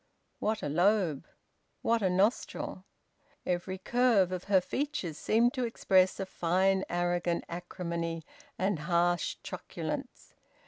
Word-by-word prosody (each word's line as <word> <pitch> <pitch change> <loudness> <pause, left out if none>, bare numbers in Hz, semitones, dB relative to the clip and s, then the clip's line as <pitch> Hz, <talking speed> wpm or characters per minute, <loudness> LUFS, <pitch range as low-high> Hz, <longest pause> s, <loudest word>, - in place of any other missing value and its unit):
What 215 0 -1
a - - -1
lobe! 175 -1 +2 0.6
What 230 0 +2
a 190 - +2
nostril! 195 +6 0 0.6
Every 180 +1 -2
curve 220 -2 +3
of 185 -1 -4
her 195 -1 +5
features 265 - -3
seemed 235 +3 +3
to 255 -3 -1
express 190 -6 +2
a 195 - -1
fine 190 +2 +1
arrogant 175 0 0
acrimony 170 -1 -4 0.3
and 190 -3 0
harsh 175 +2 +1
truculence. - - -6
185 Hz, 120 wpm, -30 LUFS, 175-205 Hz, 0.6 s, her